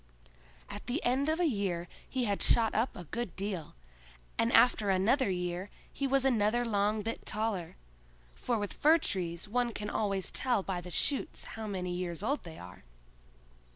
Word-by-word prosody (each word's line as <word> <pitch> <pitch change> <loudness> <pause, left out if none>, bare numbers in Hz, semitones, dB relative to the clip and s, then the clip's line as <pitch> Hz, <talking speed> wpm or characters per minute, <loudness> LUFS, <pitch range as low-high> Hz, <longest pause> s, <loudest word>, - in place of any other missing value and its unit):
At - - -8
the 255 +6 -1
end 265 +4 +2
of 320 +2 +1
a 355 - +3
year 195 - -1 0.2
he 260 -1 -1
had 200 -2 0
shot 225 -2 +4
up 230 +4 0
a 180 - -7
good 210 +3 -4
deal, 190 - -4 0.6
and 230 +1 +2
after 225 -3 +5
another 215 +7 +3
year 180 +1 -2 0.2
he 275 - -1
was 270 0 +2
another 240 -1 +3
long 210 -1 +1
bit 225 +2 -4
taller; 210 -5 -2 0.6
for 240 - -1
with 205 -2 -3
fir 315 +3 +5
trees 175 - -2
one 240 +2 +1
can 210 -1 -4
always 195 -3 -1
tell 245 -6 +1
by 185 -2 -3
the 180 - -9
shoots 275 - 0
how 220 -1 -5
many 185 -3 -3
years 175 0 -3
old 280 +7 0
they 165 -2 -10
are. 90 +2 -11
210 Hz, 175 wpm, -31 LUFS, 185-245 Hz, 0.6 s, after